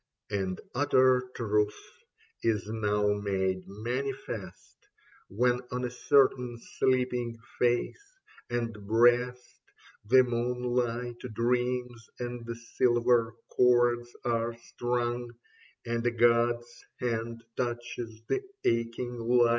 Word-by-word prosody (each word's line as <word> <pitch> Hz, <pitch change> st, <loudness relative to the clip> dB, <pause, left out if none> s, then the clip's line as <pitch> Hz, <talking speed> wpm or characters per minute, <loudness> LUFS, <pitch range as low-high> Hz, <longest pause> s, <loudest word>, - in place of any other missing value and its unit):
And 95 Hz, -2 st, -1 dB
utter 130 Hz, -1 st, +3 dB
truth 105 Hz, -2 st, +1 dB, 0.6 s
is 110 Hz, -3 st, +1 dB
now 105 Hz, -1 st, +1 dB
made 95 Hz, -2 st, -1 dB
manifest 115 Hz, -2 st, -5 dB, 0.4 s
When 125 Hz, +4 st, +2 dB
on 125 Hz, 0 st, -2 dB
a 120 Hz, -, -3 dB
certain 125 Hz, -2 st, +3 dB, 0.2 s
sleeping 125 Hz, -2 st, +1 dB, 0.2 s
face 125 Hz, -, 0 dB, 0.3 s
and 120 Hz, -1 st, -1 dB
breast 120 Hz, +3 st, +3 dB, 0.5 s
The 130 Hz, +4 st, +6 dB
moonlight 120 Hz, 0 st, -1 dB, 0.2 s
dreams 125 Hz, 0 st, -1 dB
and 120 Hz, -1 st, -5 dB, 0.3 s
silver 120 Hz, -2 st, +3 dB, 0.2 s
chords 120 Hz, -1 st, +4 dB, 0.2 s
are 115 Hz, -1 st, 0 dB
strung, 120 Hz, 0 st, -2 dB, 0.5 s
And 115 Hz, 0 st, -1 dB
a -, -, +5 dB
god's 120 Hz, 0 st, +2 dB, 0.2 s
hand 115 Hz, -1 st, -2 dB
touches 120 Hz, -2 st, -4 dB
the -, -, 0 dB, 0.2 s
aching 115 Hz, +1 st, 0 dB
lyre." 120 Hz, +1 st, +4 dB
120 Hz, 95 wpm, -29 LUFS, 115-125 Hz, 0.6 s, The